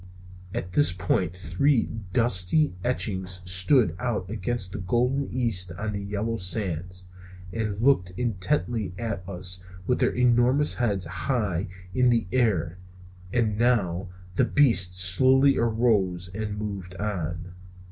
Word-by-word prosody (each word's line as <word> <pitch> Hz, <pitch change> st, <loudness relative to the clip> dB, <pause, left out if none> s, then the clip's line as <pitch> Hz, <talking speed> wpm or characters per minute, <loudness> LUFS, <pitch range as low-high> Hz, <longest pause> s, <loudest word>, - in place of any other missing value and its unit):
At 90 Hz, -, -5 dB
this 145 Hz, 0 st, +3 dB
point 90 Hz, -1 st, -1 dB
three 110 Hz, -, +1 dB, 0.3 s
dusky 120 Hz, -, +2 dB
etchings 95 Hz, -7 st, -1 dB
stood 90 Hz, -, +3 dB
out 105 Hz, -6 st, -3 dB
against 110 Hz, -2 st, -3 dB
the 100 Hz, -, -6 dB
golden 125 Hz, +8 st, 0 dB
east 110 Hz, -8 st, -1 dB
on 105 Hz, +4 st, -4 dB
the 100 Hz, -, -3 dB
yellow 105 Hz, +3 st, -3 dB
sands, 90 Hz, -2 st, -1 dB, 0.5 s
and 110 Hz, -3 st, -3 dB
looked 115 Hz, -8 st, +3 dB
intently 95 Hz, -2 st, -1 dB
at 110 Hz, -3 st, -4 dB
us 90 Hz, -1 st, -4 dB, 0.2 s
with 125 Hz, -, 0 dB
their -, -, +3 dB
enormous 125 Hz, +4 st, +3 dB
heads 100 Hz, -7 st, -1 dB
high 100 Hz, 0 st, -2 dB, 0.3 s
in 125 Hz, +2 st, +3 dB
the 115 Hz, -3 st, +2 dB
air. 95 Hz, -9 st, 0 dB, 0.5 s
And 110 Hz, -3 st, 0 dB
now 100 Hz, -7 st, +1 dB, 0.2 s
the -, -, +2 dB
beast 95 Hz, -11 st, +3 dB
slowly 130 Hz, +9 st, +5 dB
arose 105 Hz, -6 st, +1 dB
and 105 Hz, 0 st, -4 dB
moved 100 Hz, -4 st, -6 dB
on. 90 Hz, -4 st, -4 dB
100 Hz, 125 wpm, -25 LUFS, 90-120 Hz, 0.5 s, slowly